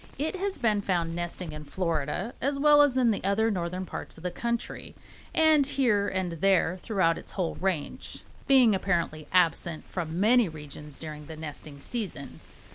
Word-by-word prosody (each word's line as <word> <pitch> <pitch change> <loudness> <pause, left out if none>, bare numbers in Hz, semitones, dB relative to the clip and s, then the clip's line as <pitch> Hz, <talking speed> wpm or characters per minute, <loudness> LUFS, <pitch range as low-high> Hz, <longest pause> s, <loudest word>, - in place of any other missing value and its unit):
It 305 +7 -1
has 390 +1 -2
been 215 -5 +1
found 170 -4 -1
nesting 175 -1 -4
in 150 0 -7
Florida 165 - -2
as 275 +2 0
well 295 +1 +6
as 280 -3 +4
in 245 -3 +4
the 205 - -2
more 210 +4 +2
northern 180 0 -3
parts - - -7
of 160 - -13
the 180 - -2
country, 235 +5 -4 0.4
and 315 -2 +5
here 235 -7 +1
and 185 -2 -1
there 190 -2 +3
throughout 190 -6 +1
its - - -11
whole 180 -4 -1
range, 180 -5 -3 0.2
being 255 -5 +6
apparently 170 -5 -1
absent 170 -2 +1
from 170 -1 -4
many 225 0 +4
regions 150 -1 -10
during 150 -2 -7
the 160 - -8
nesting 150 -2 -8
season. 185 - -5
185 Hz, 170 wpm, -28 LUFS, 160-235 Hz, 0.4 s, well